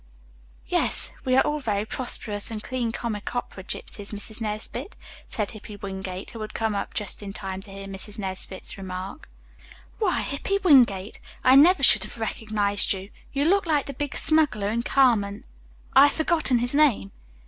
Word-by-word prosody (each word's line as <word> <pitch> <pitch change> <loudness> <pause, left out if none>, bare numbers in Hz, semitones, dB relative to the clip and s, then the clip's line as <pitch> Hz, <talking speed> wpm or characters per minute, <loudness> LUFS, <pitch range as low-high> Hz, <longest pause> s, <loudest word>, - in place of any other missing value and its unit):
"Yes, - - +2
we 255 -1 +2
are - - +5
all 300 0 -1
very 210 -6 -1
prosperous 215 -3 -2
and 220 -2 -6
clean 250 -3 -2
comic 230 -1 -4
opera 220 -5 -4
gypsies, 200 +2 -3
Mrs. 215 +2 -5
Nesbit," 220 - -4 0.3
said 210 -3 -2
Hippy 215 -1 -10
Wingate, 190 -1 -6
who 225 - -8
had 215 - -7
come 220 -1 0
up 200 - -4
just 210 -1 -2
in 200 -1 -7
time 190 -2 -5
to 195 - -12
hear 195 0 -8
Mrs. 195 +1 -7
Nesbit's 190 -1 -4
remark. 185 +6 -7 0.7
"Why, 395 -6 +1
Hippy 290 +8 -1
Wingate, 235 - +4 0.2
I 255 +1 +6
never 310 +2 +6
should - - +6
have - - -9
recognized 215 -3 +1
you. 195 +1 -8 0.2
You 280 +1 0
look 385 +2 +3
like 300 -3 +2
the 280 - -6
big 285 +1 -4
smuggler 285 -10 +2
in 235 +1 0
'Carmen.' 225 -6 +2 0.5
I 275 +2 +8
have - - -2
forgotten 315 -5 +3
his 245 +2 +3
name." 280 - +3
220 Hz, 170 wpm, -25 LUFS, 200-270 Hz, 0.7 s, I